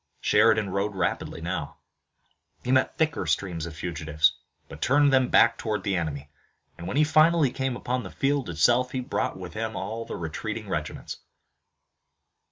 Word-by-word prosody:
Sheridan 110 -2 +3
rode 100 +2 -1
rapidly 90 -2 -2
now. - - -4 0.9
He 125 - -1
met 130 0 +2
thicker 155 -2 0
streams 85 -4 -1
of 80 - -9
fugitives, 80 -2 +1 0.3
but - - -11
turned 140 +3 +4
them 130 -1 +4
back 115 0 +5
toward 110 -2 -2
the 100 -2 0
enemy, 75 -4 -4 0.4
and 85 - -8
when 110 - -2
he 155 - +5
finally 155 -2 +4
came 130 -1 -2
upon 125 +1 -2
the - - -8
field 140 -5 -1
itself 125 +10 +2
he 130 - -1
brought 130 -3 -2
with 90 -2 -8
him 110 0 -3
all 115 +1 -4
the - - -7
retreating 80 -2 -5
regiments. - - -4
110 Hz, 165 wpm, -26 LUFS, 85-130 Hz, 0.9 s, back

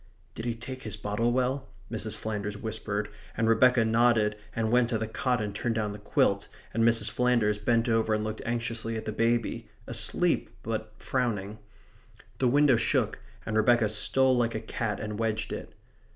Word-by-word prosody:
"Did 115 - -6
he 120 -1 -1
take 130 +2 -7
his 110 -1 -5
bottle 105 +3 0
well?" 130 +2 0 0.2
Mrs. 110 -2 -2
Flanders 105 -1 -4
whispered, 105 -1 -3 0.3
and 115 0 +2
Rebecca 120 +1 +5
nodded 110 -2 +3 0.2
and 110 -1 0
went 120 -1 +4
to 115 - +1
the 110 0 -3
cot 125 +3 0
and 105 -2 -3
turned 115 +3 -1
down 105 -2 -1
the 105 - -9
quilt, 100 -1 +1 0.3
and 115 - +2
Mrs. 115 -2 +3
Flanders 120 -4 +2
bent 115 +3 +2
over 110 -1 +2
and 105 - -2
looked 110 0 -4
anxiously 115 -1 -2
at 110 - -6
the - - -2
baby, 115 +1 0 0.2
asleep, - - +1
but 110 -1 -3
frowning. 110 -5 -2 0.8
The 130 - +3
window 140 0 +5
shook, - - 0 0.3
and 110 - -3
Rebecca 110 0 +4
stole 130 +5 +3
like 120 -2 +1
a - - -1
cat 110 -1 -3
and 105 0 -5
wedged 110 -1 -1
it. - - -7
115 Hz, 180 wpm, -28 LUFS, 105-120 Hz, 0.8 s, Rebecca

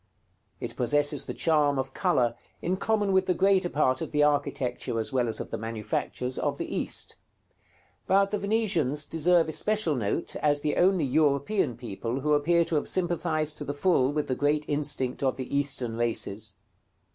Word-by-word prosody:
It - - -5
possesses 145 +4 +1
the - - -3
charm 150 -4 +2
of 135 0 -3
color 120 -2 +1 0.3
in 180 +2 -1
common 210 -1 +1
with 190 0 +3
the 180 - +2
greater 190 0 +3
part 130 -4 +1
of - - -4
the 150 -1 +3
architecture, 140 -5 0
as 110 - -3
well 125 -2 +2
as 115 - -3
of - - -6
the - - -3
manufactures, 115 +3 -3
of - - -1
the - - -4
East; - - -3 0.9
but 195 +1 +3
the 210 - -1
Venetians 195 - +1
deserve 165 +1 +2
especial 205 +1 0
note 120 +4 -2
as 145 -1 +1
the 150 - 0
only 180 -3 +3
European 140 - +1
people 120 +2 -4
who 150 +2 +1
appear 170 +3 +3
to 160 - 0
have 145 - -1
sympathized 155 -4 0
to - - -4
the 145 0 -4
full 145 -4 +2
with 150 0 -2
the 130 - 0
great 145 +3 +1
instinct 140 -3 -2
of 135 -2 +1
the 130 +1 -5
Eastern 135 -5 -1
races. 110 -3 -2
145 Hz, 180 wpm, -27 LUFS, 130-170 Hz, 0.9 s, with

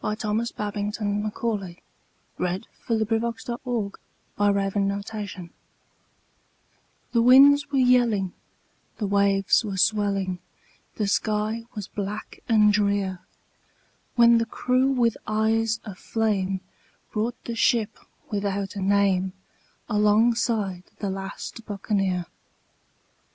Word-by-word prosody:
Thomas 225 +1 -1
Babbington 205 0 -2
Macaulay 210 -4 -3 0.6
The 180 +1 -1 0.3
Last 225 +1 -1 1.4
Buccaneer 200 -2 -5 1.6
THE 235 - +3
winds 280 +4 +7
were 275 - +1
yelling, 240 -7 +3 0.6
the 215 - -2
waves 200 +1 +3
were 200 -3 -4
swelling, 195 -2 +1 0.6
The 210 - -1
sky 215 +2 0
was 210 -3 -5
black 205 +1 -6
and 210 -2 +5
drear, 200 -3 +1 1.0
When 235 -1 +6
the 230 - -1
crew 255 +3 +1
with 235 -4 +2
eyes 220 +1 +1
of 195 -4 -8
flame 195 -4 -1 0.5
brought 230 +3 -1
the 235 - -3
ship 225 -1 +1 0.3
without 200 -1 -2
a 200 - -4
name 190 -1 +2 0.5
Alongside 210 -2 +2
the 200 -2 -3
last 195 +4 -6
Buccaneer. 195 -3 -1
210 Hz, 95 wpm, -25 LUFS, 195-230 Hz, 1.6 s, winds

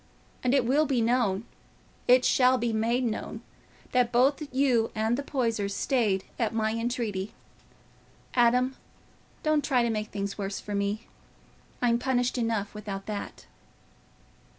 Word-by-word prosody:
And 255 +2 +3
it 265 -4 +3
will 290 +5 +3
be 260 -3 +1
known—it 235 +2 0
shall 255 0 +4
be 240 -2 -1
made 230 +3 +1
known, 225 -3 -3 0.5
that 250 -1 +2
both 265 +5 +3
you 255 -4 +2
and 220 +2 +1
the 275 - -2
Poysers 230 -8 -1
stayed 215 -8 +1 0.2
at 225 -1 0
my 220 -1 +1
entreaty. 225 -4 -2 1.0
Adam, 250 +2 +3 0.7
don't 310 -1 +2
try 255 -4 +2
to 235 - +1
make 215 -1 -2
things 200 0 -4
worse 195 0 -3
for 210 - -7
me; 200 +3 -1 0.8
I'm 235 -1 +3
punished 245 -1 0
enough 225 -3 -1
without 200 -2 -6
that." 210 -2 -6
235 Hz, 135 wpm, -28 LUFS, 215-255 Hz, 1.0 s, shall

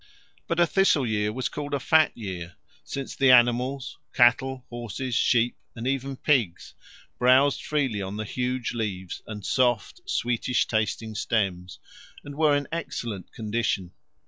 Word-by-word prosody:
But 170 - -1
a 175 - +6
thistle 170 -6 +3
year 105 -2 0
was 125 +3 -2
called 145 -1 -4
a - - -1
fat 155 +1 +3
year, 90 -6 -6 0.3
since 135 -1 -6
the 135 -1 +3
animals 125 +2 +3 0.2
cattle, 130 +1 +3
horses, 120 +2 -5
sheep, 120 0 +2 0.2
and 115 0 -6
even 135 0 -2
pigs 125 - 0 0.5
browsed 130 +3 +4
freely 135 -9 -1
on 95 +1 -5
the 110 - -3
huge 125 +2 -2
leaves 100 -6 -4
and 105 -2 -7
soft 120 -5 +1
sweetish 120 0 0
tasting 110 0 -1
stems, 95 -5 -1 0.5
and 145 - -8
were 150 -1 +3
in 145 - -4
excellent 120 - -5
condition. 105 -4 -2
120 Hz, 145 wpm, -26 LUFS, 110-135 Hz, 0.5 s, a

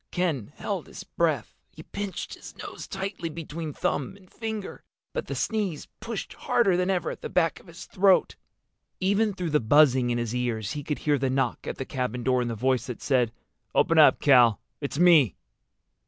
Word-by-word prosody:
Ken 160 - -1
held - - -4
his - - -9
breath. - - -1 0.2
He - - -13
pinched 200 -1 -5
his - - -11
nose - - -8
tightly 190 -3 -4
between 160 0 -6
thumb 145 +5 -2
and 185 -2 -21
finger. 220 -3 -5 0.3
But - - -3
the - - -4
sneeze 205 -9 -2
pushed 230 -1 -5
harder 195 -6 +2
than 180 +1 0
ever 185 -2 0
at - - -9
the - - -5
back 165 -3 +1
of - - -20
his 170 0 -10
throat. 190 -1 +3 0.6
Even 205 +3 +2
through 180 -4 -3
the 150 - +4
buzzing 130 0 +4
in 120 - 0
his 120 -1 -2
ears 120 -4 -2
he 145 - -4
could 150 +1 -2
hear 145 -2 +3
the 135 0 0
knock 130 -2 -1
at - - -4
the 135 - -4
cabin 125 -2 -3
door 125 0 +2
and 120 - -2
the 115 - -3
voice 130 +2 0
that 125 - -6
said, 125 -5 +1 0.4
"Open 165 -1 +4
up, 150 - +7
Cal. 125 -6 +5 0.2
It's 140 -1 -4
me." 160 - +5
150 Hz, 195 wpm, -26 LUFS, 125-185 Hz, 0.6 s, up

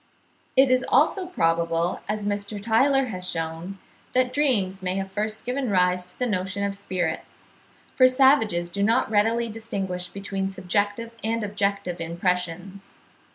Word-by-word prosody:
It 265 0 +5
is 255 0 +3
also 325 +7 +3
probable, 165 - 0
as 210 -1 -2
Mr. 205 0 -2
Tylor 260 +5 +3
has 180 -3 -3
shewn, 165 +4 -4 0.4
that 255 0 +2
dreams 210 -10 +1
may 185 0 -2
have 195 0 -3
first 215 +2 -3
given 255 0 -1
rise 180 -1 +2
to 180 - -15
the 250 - 0
notion 195 -2 -1
of 200 - -2
spirits; 185 -5 -4 0.4
for 255 - +7
savages 255 -10 +3
do 200 - -3
not 225 +3 +2
readily 225 +3 +2
distinguish 195 -5 -4
between 195 0 -4
subjective 205 +4 -1
and 225 0 -1
objective 200 -3 -2
impressions. 180 +3 -2
200 Hz, 145 wpm, -25 LUFS, 180-230 Hz, 0.4 s, for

